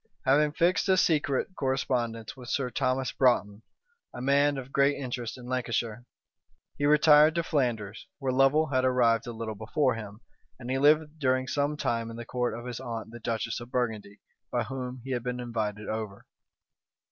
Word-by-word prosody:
Having 145 +3 +3
fixed 180 +5 +2
a 190 - +5
secret 150 -6 +2
correspondence 125 -4 -2
with 125 -2 -10
Sir 130 -3 -1
Thomas 130 +1 0
Broughton, 110 -5 +2 0.5
a - - -6
man 140 +2 +2
of 135 0 -7
great 140 +1 +3
interest 125 -3 -4
in 125 - -11
Lancashire, 120 -2 -2 0.7
he 145 - 0
retired 150 +1 +6
to 170 - +1
Flanders, 115 -10 -2
where 135 -2 -1
Lovel 135 +4 +3
had 130 0 +2
arrived 120 -3 +2
a - - -3
little 110 -1 -5
before 125 +5 0
him; 105 -1 -8 0.4
and 125 0 -6
he 135 - 0
lived 150 +2 +3
during 130 -2 +1
some 145 +3 -1
time 115 -4 -1
in 115 - -8
the 120 - -7
court 125 -2 -2
of 120 - -8
his 125 -1 -5
aunt 115 -3 -6
the 120 - -9
duchess 115 -1 -2
of 120 0 -10
Burgundy, 110 -5 -3 0.3
by - - 0
whom 130 -1 -6
he 135 - -6
had 125 -2 -1
been 125 +1 -4
invited 110 -3 -3
over. 110 -2 -5
125 Hz, 180 wpm, -28 LUFS, 115-140 Hz, 0.7 s, retired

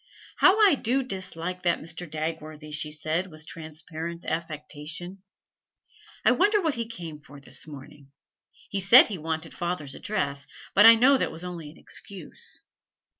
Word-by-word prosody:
'How 380 +3 +6
I 410 -5 +7
do 265 0 +1
dislike 185 -5 -5
that 175 -1 +2
Mr. 165 +1 -6
Dagworthy!' 155 -1 -5
she 150 0 -3
said, 155 +4 -1
with 155 -3 -13
transparent 165 +1 -7
affectation. 160 +3 -5 1.0
'I - - +7
wonder 415 +3 +4
what 320 -6 +1
he 230 -2 -3
came 170 -9 -7
for 145 -1 -14
this 135 +2 -6
morning. 140 -1 -12 0.6
He 200 - -1
said 215 +8 +8
he 195 -5 -4
wanted 160 +1 -3
father's 170 -5 -3
address, 140 -9 -2 0.3
but 205 +3 +8
I 230 - +11
know 260 +4 +5
that - - 0
was 160 +2 -8
only 170 -4 -6
an 155 - -15
excuse. 190 -6 -8
165 Hz, 155 wpm, -27 LUFS, 155-195 Hz, 1.0 s, I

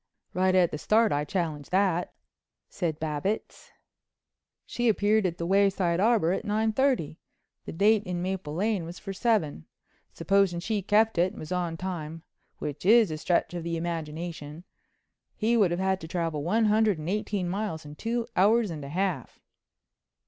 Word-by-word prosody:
"Right 185 0 +2
at 180 -2 +4
the 150 - -4
start 220 +5 +3
I 145 +1 +1
challenge 155 -4 -3
that," 185 -2 +1 0.6
said 165 -5 -3
Babbitts. 160 +7 -3 1.0
"She 240 -1 0
appeared 210 -1 +2
at 170 -1 -5
the 170 - -3
Wayside 190 -2 +2
Arbor 210 -5 +3
at 190 - -1
nine 220 +1 0
thirty. 250 - 0 0.5
The - - -6
date 210 +5 +3
in 180 -1 -3
Maple 180 -4 -3
Lane 205 0 0
was 170 +2 -8
for 195 - -7
seven. 195 - 0 0.4
Supposing 195 -3 +1
she 210 +3 -2
kept 215 0 +2
it 180 +3 +2
and - - -11
was 155 - -8
on 175 -2 -2
time—which 160 -4 -7
is 215 -1 +5
a 155 - -3
stretch 175 +2 0
of 175 - -4
the 170 0 -2
imagination—he 165 +6 -5
would 205 -6 +4
have 175 +1 -2
had 190 0 0
to 160 - -7
travel 165 -3 -2
one 220 +7 +2
hundred 215 -2 +3
and 155 +1 -7
eighteen 200 -1 -1
miles 185 -4 -3
in 145 - -9
two 230 +8 -2
hours 210 +2 +3
and 155 -3 -6
a 140 - -7
half." 175 -5 -2
185 Hz, 165 wpm, -27 LUFS, 165-210 Hz, 1.0 s, is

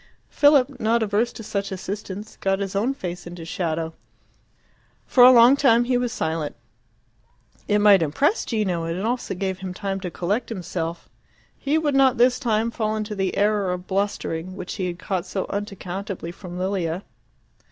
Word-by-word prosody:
Philip, 280 -3 +4
not 230 +1 +2
averse 220 +3 +1
to 225 - -9
such 200 -1 -3
assistance, 200 +2 -6
got 195 0 0
his 195 0 -4
own 240 +7 +1
face 180 -7 -6
into 175 -1 -8
shadow. 165 -1 -2 1.1
For 250 - +5
a 250 - +10
long 240 +2 +7
time 240 -4 +4
he 250 +1 0
was 245 -1 0
silent. 160 -7 -2 1.1
It 205 - +3
might 205 -3 +6
impress 270 - +1
Gino, 195 -7 -1
and 165 +1 -3
it 195 - -3
also 240 -4 -2
gave 190 0 -3
him 185 -1 -6
time 195 -1 -3
to 185 -2 -4
collect 200 +8 -2
himself. 170 -5 -4 0.5
He 285 +3 0
would 305 -3 0
not 270 -2 +4
this 245 +1 +4
time 230 -2 0
fall 215 -2 -1
into 215 0 -3
the 195 -2 -2
error 205 -2 +2
of 180 0 -4
blustering, 185 -3 -2
which 185 -2 -6
he 185 -3 -1
had 175 -1 -4
caught 185 -1 -3
so 190 +1 -2
unaccountably 195 -2 -5
from 180 0 -9
Lilia. 185 -1 -2
200 Hz, 175 wpm, -23 LUFS, 180-230 Hz, 1.1 s, a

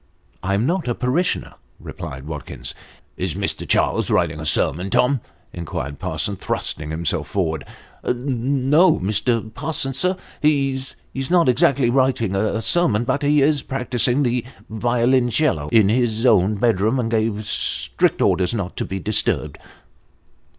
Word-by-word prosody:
" - - -37
I 100 +1 0
am 105 +4 +1
not 170 0 -1
a 120 - 0
parishioner," 140 +9 -1 0.3
replied 65 +1 -8
Watkins. 75 -2 -6 0.2
" - - -33
Is - - -2
Mr. - - -2
Charles - - +2
writing - - +1
a - - -3
sermon, 90 +6 +1
Tom? 125 +3 +2 0.2
" - - -37
inquired 70 -4 -5
Parsons, 100 -2 -1
thrusting 75 0 -3
himself 80 0 -1
forward. 80 -7 -2 0.2
" - - -28
No, 135 +6 +2
Mr. 110 +3 0
Parsons, 135 -1 -2
sir; 185 +3 +1 0.2
he's 135 -3 0 0.2
not 165 +5 +2
exactly 125 0 +3
writing 130 -6 +1
a 110 +2 0
sermon, 125 -10 +2
but 130 +3 -1
he 145 0 +3
is 145 -1 +2
practising 125 +1 0
the 120 -1 0 0.3
violoncello 120 - +1
in 105 0 +4
his 115 0 +1
own 105 -3 +4
bedroom, 110 +3 +1
and 115 -2 -1
gave 110 -1 0
strict - - 0
orders 90 +4 +1
not 95 -4 -4
to - - -2
be 95 - -4
disturbed." 105 +3 0
120 Hz, 150 wpm, -21 LUFS, 105-135 Hz, 0.3 s, in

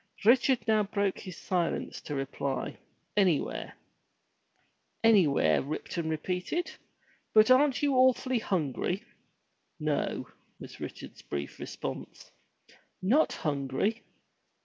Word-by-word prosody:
Richard 250 +2 +4
now 220 -1 +4
broke 200 -1 -1
his 185 -3 -8
silence 175 -3 -2
to 145 - -5
reply, 135 0 -3 0.4
"Anywhere." 170 - +1 1.3
"Anywhere!" 155 - +5
Ripton 160 +3 -4
repeated, 180 - -2 0.6
"but 215 +3 +7
aren't 275 +1 +4
you 285 -1 +3
awful 255 -1 +3
hungry?" 180 - -1 0.8
"No," 150 -2 -1 0.3
was - - -10
Richard's - - -8
brief 70 -1 -5
response. - - -7 0.7
"Not 250 +12 +3
hungry!" 145 - -1
185 Hz, 95 wpm, -30 LUFS, 150-230 Hz, 1.3 s, but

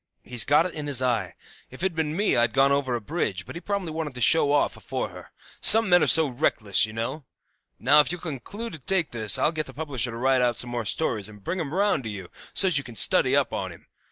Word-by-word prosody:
He's 120 -4 +3
got 150 +4 +3
it 185 - -5
in 150 -2 -6
his 140 -3 +1
eye. 115 -8 -1 0.3
If 130 +7 -11
it'd 190 -3 -1
been 155 -1 -2
me 205 +1 +1
I'd 120 -1 +1
gone 135 +1 +3
over 140 -2 0
on - - 0
a - - -6
bridge; 105 - -4
but - - -10
he 170 - -8
probably 200 -3 -4
wanted 155 -4 -5
to 125 - -7
show 145 +3 +3
off 145 - +1
afore - - -5
her; - - -13 0.3
some 225 -2 +7
men 175 -1 +5
are - - +2
so 160 -1 +5
reckless, 115 -6 0
you - - -9
know. 115 +7 -5 0.5
Now, 140 +5 +4
if 150 - +2
you'll 175 -1 -6
conclude 185 - -7
to 160 - -9
take 180 +4 -1
this 110 +1 +4
I'll 135 +4 +1
get 155 -2 -4
the 130 - -12
publisher 135 -5 -3
to 115 - -7
write 130 +1 +1
out 120 -1 0
some 120 - -2
more 120 -2 -4
stories, 110 -4 -1
and 105 -2 -15
bring 185 - -4
'em 150 -5 -4
round 195 -5 0
to - - -4
you, 95 -4 -8 0.2
so's 185 -7 +4
you - - -7
can 120 -3 -12
study - - +2
up - - 0
on - - -4
him. - - -15
140 Hz, 265 wpm, -24 LUFS, 120-160 Hz, 0.5 s, some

